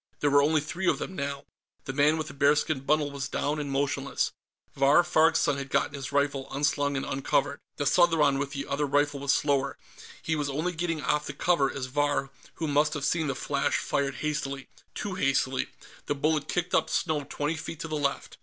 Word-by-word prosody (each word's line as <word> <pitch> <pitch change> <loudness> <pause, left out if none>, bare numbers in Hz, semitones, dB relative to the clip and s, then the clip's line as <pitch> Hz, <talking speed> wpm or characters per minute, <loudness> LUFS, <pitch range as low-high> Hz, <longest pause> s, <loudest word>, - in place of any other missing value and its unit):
There 145 - +2
were 145 0 +6
only 155 +1 +3
three 175 +5 -4
of - - +3
them, 190 - -6
now. 140 -2 -4 0.4
The 135 - -4
man 150 +3 +3
with 155 -1 -3
the - - -8
bearskin 145 +1 +2
bundle 145 +1 +1
was 140 -3 -4
down 150 +2 -1
and 145 -1 -3
motionless. 140 0 -1 0.4
Vahr 140 +5 +5
Farg's 165 -1 +4
son 145 -3 +1
had 140 0 -5
gotten - - +1
his 140 0 -6
rifle 140 -1 0
unslung 145 0 0
and 135 - -2
uncovered. 140 +1 0 0.2
The 145 - -2
Southron 150 -4 +4
with 140 0 -2
the 140 -1 -4
other 145 +1 -1
rifle 145 0 +1
was 140 0 +1
slower; 140 -2 +1 0.4
he 160 - -1
was 145 -2 -1
only 155 +6 -1
getting 165 -3 -2
off 150 +3 0
the - - -4
cover 165 -6 +2
as 130 - -4
Vahr, 140 0 0 0.2
who 165 - -3
must 150 +2 +2
have 140 -2 -2
seen 160 -2 +1
the 135 - -1
flash, 140 +1 0
fired 140 -1 -1
hastily. 140 -3 -3 0.3
Too 205 - -3
hastily; 135 -4 +1 0.4
the 145 - 0
bullet 150 +1 0
kicked 175 0 -2
up - - +2
snow 155 -3 0
twenty 150 +3 -1
feet 160 0 -7
to - - -4
the 155 - -3
left. 140 -2 -2
145 Hz, 210 wpm, -28 LUFS, 140-155 Hz, 0.4 s, were